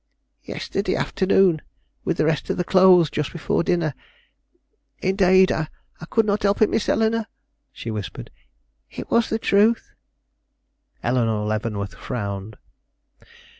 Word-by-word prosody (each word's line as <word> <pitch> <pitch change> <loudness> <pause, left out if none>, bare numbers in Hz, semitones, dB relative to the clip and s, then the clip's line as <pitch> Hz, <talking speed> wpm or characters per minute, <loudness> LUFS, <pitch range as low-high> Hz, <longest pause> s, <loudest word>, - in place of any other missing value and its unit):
"Yesterday - - -3
afternoon, 190 -4 +2 0.4
with - - -1
the - - +2
rest 155 -2 -1
of - - -1
the 180 - 0
clothes, 180 -4 +5
just 150 - -2
before 170 - -1
dinner. 170 -4 0 1.1
Indade, 190 0 +4
I 155 -1 -1 0.4
could 225 -1 +2
not 205 0 0
help 200 0 +1
it, - - +2
Miss 220 - 0
Eleanore!" 225 0 +1 0.4
she 115 - -7
whispered; 105 -2 -6 0.6
"it - - -9
was 235 -1 +3
the 220 - 0
truth." 220 +1 +2 1.1
Eleanore 115 -4 0
Leavenworth 105 -2 -3
frowned. 100 -2 -5
175 Hz, 125 wpm, -22 LUFS, -, 1.1 s, clothes